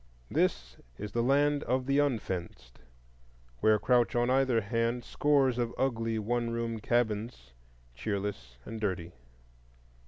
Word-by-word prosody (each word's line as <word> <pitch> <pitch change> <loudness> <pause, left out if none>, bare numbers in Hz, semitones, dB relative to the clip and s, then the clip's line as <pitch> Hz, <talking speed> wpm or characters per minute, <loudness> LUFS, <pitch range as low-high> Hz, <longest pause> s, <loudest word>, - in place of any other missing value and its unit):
This - - 0 0.2
is 105 0 -6
the 115 - 0
Land 145 +3 +3
of 130 0 0
the 140 +1 +2
Unfenced, 90 - -3 0.8
where 110 0 +4
crouch 120 +2 +2
on 120 +1 +2
either 130 -3 +3
hand 115 +3 -1
scores 135 -4 +2
of 120 -1 -2
ugly 115 -4 0
one 120 +2 -1
room 115 -1 -2
cabins, 110 - -1 0.4
cheerless 95 - -4
and 110 -1 -7
dirty. 90 -5 -2
115 Hz, 125 wpm, -30 LUFS, 105-125 Hz, 0.8 s, where